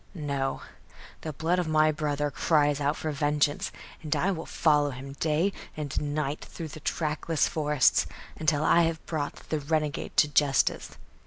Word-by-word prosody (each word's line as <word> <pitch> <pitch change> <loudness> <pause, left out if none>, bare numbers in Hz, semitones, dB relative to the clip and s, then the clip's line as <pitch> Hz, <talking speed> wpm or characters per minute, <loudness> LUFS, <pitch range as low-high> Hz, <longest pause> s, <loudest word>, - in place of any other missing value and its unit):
No; 140 -4 -2 0.6
the 155 - -4
blood 165 +5 0
of 175 - -1
my 155 0 +4
brother 145 -1 -1
cries 145 +1 +2
out 145 +2 +1
for 155 - -3
vengeance, 145 0 +1 0.3
and 155 -3 -1
I 195 - +1
will 165 -4 -5
follow 150 -2 +3
him 135 +1 -8
day 165 +5 +1 0.2
and 145 -3 -3
night 150 -1 -2
through 165 -2 -7
the 155 - -9
trackless 155 0 0
forests, 150 -3 +2 0.3
until 155 -1 +1
I 170 - +5
have 165 -1 -1
brought 150 -3 -3
the 155 - 0
renegade 150 0 -2
to - - +6
justice. 145 -1 +1
150 Hz, 160 wpm, -28 LUFS, 145-160 Hz, 0.6 s, to